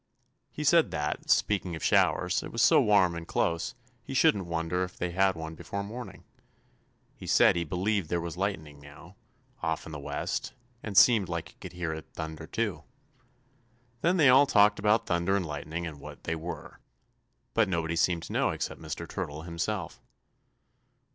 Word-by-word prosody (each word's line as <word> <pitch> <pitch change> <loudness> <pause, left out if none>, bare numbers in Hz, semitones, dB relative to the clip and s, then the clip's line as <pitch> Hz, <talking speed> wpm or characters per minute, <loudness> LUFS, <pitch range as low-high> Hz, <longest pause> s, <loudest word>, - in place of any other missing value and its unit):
He 150 - -6
said 165 +2 +4
that, 75 0 -3
speaking 95 -4 +2
of 80 - -8
showers, - - +2
it - - -8
was - - +1
so - - +6
warm 100 -4 +4
and 85 0 -7
close, 85 +9 -1 0.3
he 135 - -7
shouldn't 105 - +3
wonder 85 +2 -1
if 90 0 -7
they 90 0 -2
had 95 +1 +2
one 80 -1 -6
before 100 +5 -5
morning. 105 -2 -8 0.9
He - - -10
said - - +5
he 85 - 0
believed 90 +2 -1
there 85 - 0
was 85 0 -5
lightning 85 -7 -3
now, 75 0 -14 0.5
off 80 -1 -2
in 80 - -9
the 75 - -6
west, 70 - -3 0.3
and 100 -3 -5
seemed 105 -5 +6
like 85 -1 -4
he - - -20
could - - -8
hear 85 -2 -3
it 80 0 -8
thunder, 80 0 -6
too. 110 -4 -2 1.2
Then 180 +3 +2
they 150 -6 +6
all 135 +3 +7
talked 105 -3 +4
about 105 +2 +2
thunder 85 +3 +1
and 95 -3 0
lightning 75 +3 -5
and 75 -3 -7
what - - -11
they 80 - -2
were. 80 +2 -7 0.7
But 115 -4 +2
nobody 85 -2 -1
seemed 85 0 +1
to - - -7
know - - +2
except - - -4
Mr. - - -6
Turtle 75 +2 -5
himself. 85 +4 -4
90 Hz, 180 wpm, -29 LUFS, 80-105 Hz, 1.2 s, all